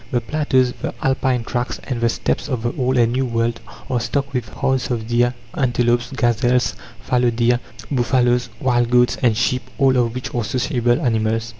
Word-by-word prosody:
The 125 - +1
plateaus, 130 -1 +1
the - - -3
Alpine 130 -2 +1
tracts, 120 +2 -3
and 125 -3 -4
the 115 - +3
Steppes 130 - -2
of 125 -4 -2
the 120 - -1
Old 130 -1 0
and 115 -1 +3
New 130 +1 0
World 115 0 -1 0.3
are 125 - 0
stocked 140 +4 -2
with 120 -4 -2
herds 130 -2 -1
of 115 -3 -2
deer, 120 +1 +1 0.2
antelopes, 120 -2 +1
gazelles, 120 -2 +1 0.3
fallow 125 +1 +2
deer, 120 +1 +2 0.3
buffaloes, 125 -1 +2
wild 120 -4 +1
goats 125 0 +3
and 115 -4 +3
sheep, 125 +2 +1 0.2
all 135 -2 +4
of 120 -1 +1
which 125 - -5
are 120 - 0
sociable 120 +1 0
animals. 115 -4 0
120 Hz, 180 wpm, -20 LUFS, 120-130 Hz, 0.3 s, all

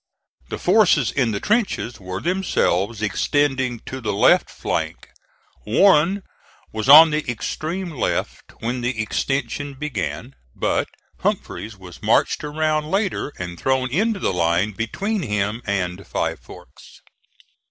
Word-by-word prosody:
The - - -4
forces 165 - +3
in 130 -4 +1
the 100 - -2
trenches 205 - 0
were 95 -1 -6
themselves 115 - 0
extending 130 +2 0
to 130 0 -7
the 110 -3 -1
left 100 - +4
flank. - - -4 0.5
Warren 185 - +4 0.5
was 110 +4 -3
on 155 +3 +10
the 150 0 0
extreme 165 - -3
left 140 - -3
when 120 +2 -2
the 120 -1 -2
extension 135 +5 -2
began, 130 - -4 0.2
but - - 0 0.3
Humphreys 105 -1 -3
was 90 -2 -12
marched - - +2
around 155 0 -1
later 195 -6 -1
and 85 -1 -6
thrown 130 -1 0
into 205 - 0
line 85 +3 +1
between 195 - -2
him 105 -1 -1
and 95 -1 -2
Five - - -2
Forks. - - -15
130 Hz, 125 wpm, -22 LUFS, 105-155 Hz, 0.5 s, on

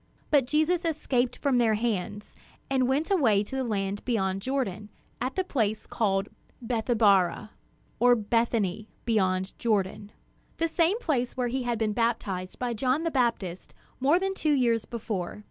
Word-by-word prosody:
But 280 -4 +4
Jesus 315 +5 +2
escaped 275 -6 0
from 270 -4 +1
their 225 -2 +3
hands, 210 -2 -3 0.4
and 260 -2 +2
went 285 +8 0
away 225 - +4
to 265 - -7
the 265 - 0
land 200 -3 -2
beyond 195 -5 0
Jordan, 215 -5 -2 0.3
at 255 +2 -2
the 375 - +1
place 220 - -1
called 195 -3 0 0.3
"Bethabara," 220 -5 +2 0.5
or 245 +1 +6
"Bethany 220 -2 0 0.2
beyond 190 -4 +1
Jordan," 205 -2 -1 0.5
the 330 - +1
same 335 +4 +2
place 260 - -1
where 245 -1 0
he 260 +2 -1
had 240 -2 -1
been 215 -1 0
baptized 205 -5 -1
by 245 -1 -2
John 255 +7 0
the 330 - -1
Baptist 230 - -1 0.2
more 280 +6 +4
than 385 +1 -1
two 310 -5 +1
years 235 -5 +2
before. 210 -6 -4
235 Hz, 155 wpm, -27 LUFS, 205-265 Hz, 0.5 s, or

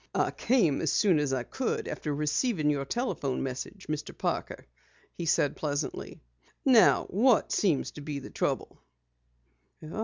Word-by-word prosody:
"I - - +2
came 210 - +2
as 160 - +1
soon 185 -7 +3
as 145 -2 0
I 130 -2 0
could 260 - -3
after 150 - -4
receiving 150 - +1
your 140 -1 -1
telephone 145 - -2
message, 135 +9 -6
Mr. 155 -1 -4
Parker," - - -3 0.5
he 170 - -5
said 145 -2 +2
pleasantly. 145 - -4 0.4
"Now 250 -5 +6
what 230 +5 +3
seems 175 -9 +1
to 150 - -10
be 145 0 -4
the 140 - -8
trouble?" - - -2
150 Hz, 145 wpm, -29 LUFS, 145-210 Hz, 0.5 s, Now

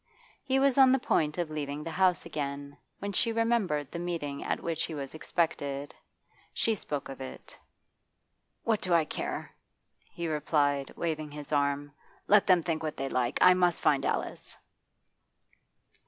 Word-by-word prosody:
He 265 0 0
was 275 0 +3
on 260 -1 +8
the 265 - +5
point 155 - +1
of 170 -3 -2
leaving 145 -1 -4
the 165 - -5
house 185 -1 +2
again, 140 -1 -4 0.2
when 200 +1 -4
she 230 +5 +2
remembered 225 - 0
the 170 - -4
meeting 165 -5 -3
at - - -1
which 165 -2 -2
he 160 - -6
was 140 -2 -5
expected. 145 -4 -2 0.6
She 225 - +2
spoke 150 -8 -4
of 135 0 -8
it. 130 - -9 1.1
'What 225 -2 +1
do 180 -2 +2
I 165 -2 +4
care?' - - -4 0.6
he 170 -1 -4
replied, 145 -3 +1
waving 155 -2 -2
his 145 0 -7
arm. 145 0 0 0.4
'Let 210 -1 +5
them 180 -3 +5
think 160 -2 -1
what 155 -2 -4
they 135 0 -2
like. 125 -2 0
I 180 - +9
must 180 -2 +2
find 140 -2 +3
Alice. - - -3
155 Hz, 160 wpm, -29 LUFS, 145-180 Hz, 1.1 s, I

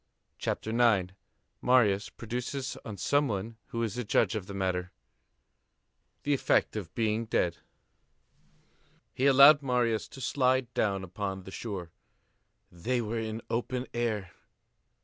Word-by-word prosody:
CHAPTER 110 - -2
IX—MARIUS 105 0 +1
PRODUCES 125 +3 -4
ON 105 -3 -7
SOME 145 +9 +2
ONE 110 +1 -4
WHO 115 0 -3
IS 115 +1 -3
A - - -1
JUDGE 105 - +2
OF 105 -4 -4
THE 100 - -7
MATTER, 95 -1 -1 1.3
THE 145 - +1
EFFECT 135 - +2
OF 95 -7 -6
BEING 110 0 0
DEAD 85 -6 0 1.6
He 130 - +2
allowed 140 +2 +8
Marius 125 -4 +1
to - - -12
slide 130 -1 +1
down 100 -3 0
upon 95 +1 -4
the 95 - -10
shore. 95 -6 -5 0.8
They 120 +9 -1
were 115 0 -2
in 110 0 -3
the 115 - -10
open 125 +2 -1
air! 110 -6 -1
115 Hz, 130 wpm, -29 LUFS, 100-125 Hz, 1.6 s, allowed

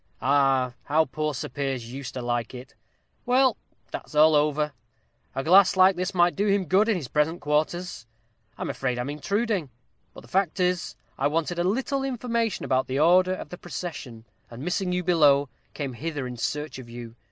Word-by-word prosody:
Ah, 135 -2 +2
how 155 +2 +3
poor 150 +1 -3
Sir - - -4
Piers 135 -4 -4
used 135 -1 -7
to 125 - -4
like 120 0 -2
it! 125 +1 -10 0.5
Well, 255 -1 +3 0.4
that's - - -7
all 155 +1 +6
over 150 0 +1 0.6
a 135 - -2
glass 190 +4 +6
like 185 0 +6
this 185 +2 -3
might 175 0 +4
do 205 +2 0
him 200 -1 +2
good 195 +6 +3
in 220 - +3
his 160 -8 -4
present 150 +5 0
quarters! 155 -2 -1 0.5
I'm - - -3
afraid 125 -2 -2
I'm 125 +3 -3
intruding. 195 - -1 0.5
But - - -10
the - - -17
fact 190 -1 0
is, 180 -1 0 0.2
I - - +3
wanted 165 +3 -1
a - - +2
little 265 +8 0
information 235 -4 -1
about 130 0 +1
the 130 - -2
order 185 +4 +4
of - - -8
the 180 - -9
procession, 145 -10 -7 0.2
and 120 +3 -9
missing 180 +2 -1
you 180 0 -1
below, 145 -6 +4 0.3
came 140 -4 -4
hither 145 +1 -4
in 125 0 -6
search 150 +3 -3
of 120 -2 -11
you. 120 -1 -9
155 Hz, 185 wpm, -26 LUFS, 135-185 Hz, 0.6 s, all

